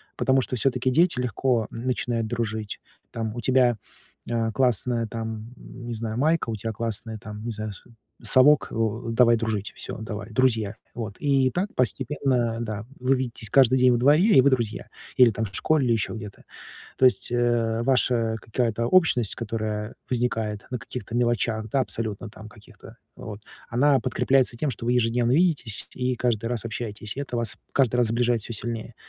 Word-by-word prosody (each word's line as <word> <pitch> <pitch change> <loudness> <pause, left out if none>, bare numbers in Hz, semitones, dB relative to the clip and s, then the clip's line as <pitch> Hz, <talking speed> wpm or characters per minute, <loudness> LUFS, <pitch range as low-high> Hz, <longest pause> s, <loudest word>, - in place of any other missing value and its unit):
Потому 130 0 +2
что, 125 - -3
всё-таки, 130 +1 0
дети 165 -1 +3
легко, 120 -1 0
м, 115 +2 -7
начинают 120 -2 -1
дружить. 110 -2 -3 0.3
Там, 110 0 -4
у 120 - -4
тебя, 125 -1 +3 0.5
э, 115 -1 0
классная, 120 -1 +1
там, 110 +1 -6
не 120 -1 -8
знаю, 110 0 -4
майка, 155 -2 +1
у 110 - -2
тя 110 +2 -4
классный, 110 0 -4
там, 105 -1 -9
не 120 - -2
знаю, 110 -1 -5
су 120 - -17 0.3
совок, 140 +2 +6
о, 115 +1 -2
давай 120 0 +5
дружить, 110 -3 -3
всё, - - -5
давай, 105 0 -6
друзья. 110 -4 +1 0.2
Вот, 110 -4 -6
и 135 -3 +2
так, 190 +4 -2
постепенно, 125 -1 0
да, 110 -2 -4
вы 130 +2 +2
видитесь 120 -4 -2
каждый 130 0 +5
день 125 0 +5
во 120 - +3
дворе, 145 +8 +4
и - - +9
вы 140 - +4
друзья. 115 -5 -1 0.3
Или 125 -3 +7
там 110 +2 -3
в 95 - -10
школе, 155 -3 +2
или 120 - +2
еще 110 - -1
где-то. 105 -3 -9 0.6
То 130 - +3
есть, 125 - +3
э, 120 -1 +1
ваша 120 -3 +1
какая-то 115 0 -1
общность, 125 - +3
которая 110 -1 -4 0.2
возникает 115 -4 -1
на 125 - -3
каких-то 120 -2 -8
мелочах, 115 -2 0
да, 135 - +2
абсолютно 110 -2 -2
там 110 0 -12
каких-то, 110 +1 -16 0.2
вот, 105 -1 -8 0.3
она 135 +3 +3
подкрепляется 130 -1 +1
тем, 140 +4 -1
что 115 - -6
вы 120 - +2
ежедневно 120 +1 +1
видитесь 155 - +1
и 125 -1 -1
каждый 115 -2 0
раз 120 -2 -2
общаетесь. 110 -1 -5
И - - -3
это 135 -3 -4
вас 115 -2 -2 0.2
каждый 125 -3 +2
раз 120 -2 +3
сближает 120 0 +1
всё 115 - -6
сильнее. 115 +1 -4
115 Hz, 180 wpm, -25 LUFS, 110-125 Hz, 0.6 s, и